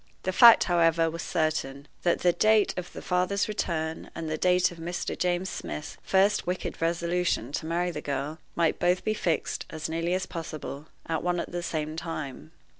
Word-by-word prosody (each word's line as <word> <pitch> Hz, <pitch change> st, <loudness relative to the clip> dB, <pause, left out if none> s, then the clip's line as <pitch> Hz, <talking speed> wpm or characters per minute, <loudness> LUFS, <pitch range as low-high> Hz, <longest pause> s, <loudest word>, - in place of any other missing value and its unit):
The 185 Hz, -, -1 dB
fact, 235 Hz, +2 st, +9 dB
however, 165 Hz, -2 st, +3 dB
was 165 Hz, 0 st, -5 dB
certain 155 Hz, -5 st, -1 dB
that 175 Hz, -, +1 dB
the 175 Hz, -1 st, +4 dB
date 215 Hz, +1 st, +4 dB
of 180 Hz, -1 st, -5 dB
the -, -, -9 dB
father's 185 Hz, +2 st, +1 dB
return 160 Hz, -6 st, -3 dB
and 160 Hz, -, -4 dB
the 155 Hz, -, -1 dB
date 180 Hz, +3 st, +3 dB
of 170 Hz, -, -11 dB
Mr. 175 Hz, +2 st, -3 dB
James 180 Hz, +1 st, 0 dB
Smith's 150 Hz, -, -6 dB
first 195 Hz, -1 st, +2 dB
wicked 180 Hz, -2 st, -3 dB
resolution 170 Hz, -6 st, 0 dB
to 155 Hz, -, -3 dB
marry 175 Hz, +2 st, 0 dB
the 150 Hz, -, -5 dB
girl 145 Hz, +3 st, -3 dB, 0.2 s
might 165 Hz, -2 st, +1 dB
both 180 Hz, +1 st, +2 dB
be 215 Hz, -, +1 dB
fixed, 170 Hz, -6 st, -1 dB
as 160 Hz, 0 st, -4 dB
nearly 165 Hz, +2 st, 0 dB
as 185 Hz, -, -1 dB
possible, 155 Hz, -3 st, -6 dB, 0.2 s
at 160 Hz, -1 st, -1 dB
one 175 Hz, 0 st, 0 dB
and -, -, -5 dB
the 175 Hz, -, -2 dB
same 155 Hz, -2 st, -3 dB
time. 155 Hz, -3 st, -6 dB
170 Hz, 190 wpm, -27 LUFS, 160-180 Hz, 0.2 s, fact